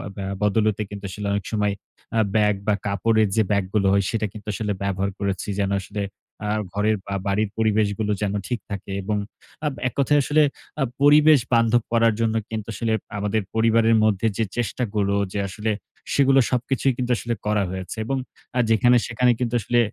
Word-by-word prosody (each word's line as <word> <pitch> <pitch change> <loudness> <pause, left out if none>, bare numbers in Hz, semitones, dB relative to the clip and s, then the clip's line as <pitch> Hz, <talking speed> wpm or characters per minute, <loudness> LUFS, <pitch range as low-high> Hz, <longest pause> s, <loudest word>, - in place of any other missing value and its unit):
ব্যা 95 -1 -4 0.2
বদলতে 105 0 +2
কিন্তু 100 -1 -8
আসলে 100 +2 -5
অনেক 100 -2 -2
সময় 105 -2 +1 0.4
আ - - +4 0.2
ব্যাগ 105 -1 +3
বা 105 - +4
কাপড়ের 110 +2 +2
যে 110 - +4
ব্যাগ 100 -1 +2
গুলো 100 -2 +2
হয় 100 0 +3
সেটা 110 -2 -1
কিন্তু 105 -1 -11
আসলে 105 0 -2
ব্যবহার 100 0 -1
করেছি। 100 -1 -2
যেন 100 -1 0
আসলে 100 +2 -5 0.4
আ - - -1 0.2
ঘরের 105 +2 +2
বা 100 - -5
বাড়ির 100 +1 +1
পরিবেশগুলো 105 -1 +1
যেন 100 -1 0
ঠিক 120 -2 -2 0.4
এবং 105 +2 -1 0.5
আ - - +3 0.2
এক 125 - -4
কথায় 145 +2 +4
আসলে 150 +3 +3 0.4
আ - - +4 0.2
পরিবেশ 150 +1 +7
বান্ধব 115 0 +4
করার 115 -1 +4
জন্য 115 -1 +1
কিন্তু 110 -1 -4
আসলে 115 +2 -1 0.2
আমাদের 105 +2 0
পরিবারের 115 0 +4
মধ্যে 110 0 +2
যে 115 - +2
চেষ্টাগুলো, 105 -4 -1 0.2
যে 105 - -1
আসলে 105 +3 -2 0.4
সেগুলো 135 -1 +5
সবকিছুই 130 +2 +1
কিন্তু 125 -1 -1
আসলে 120 +1 -2
করা 105 -1 +2
হয়েছে 95 +1 -6
এবং 135 +4 -1 0.4
আ - - +3
যেখানে 120 +3 +5
সেখানে 125 +1 +2
কিন্তু 120 -1 -1
আসলে 120 +4 +1
110 Hz, 180 wpm, -23 LUFS, 100-115 Hz, 0.5 s, পরিবেশ